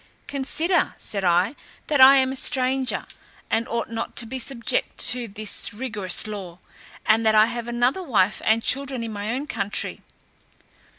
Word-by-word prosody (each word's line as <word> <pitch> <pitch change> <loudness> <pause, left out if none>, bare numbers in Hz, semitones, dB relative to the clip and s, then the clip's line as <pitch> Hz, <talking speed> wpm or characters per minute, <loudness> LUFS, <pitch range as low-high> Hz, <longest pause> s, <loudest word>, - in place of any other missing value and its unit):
"Consider," 310 +6 -1
said 200 -2 -3
I, 180 +8 +2 0.3
"that 290 -3 +1
I 270 +1 +10
am 260 -1 +3
a - - -5
stranger, 260 0 0 0.5
and 230 +2 0
ought 235 -1 -2
not 230 0 -5
to 235 - +3
be 260 +4 -6
subject 235 -1 -1
to 245 -1 -1
this 210 0 -2
rigorous 210 -7 -2
law, 195 -5 -7 0.5
and 225 +1 +3
that 220 -1 +3
I 215 0 +7
have 235 0 -5
another 240 +8 0
wife 215 - +1
and 225 +1 +2
children 270 -2 0
in 225 -1 -5
my 205 +1 -4
own 265 +4 -3
country." 210 -9 -3
235 Hz, 165 wpm, -23 LUFS, 215-260 Hz, 0.5 s, I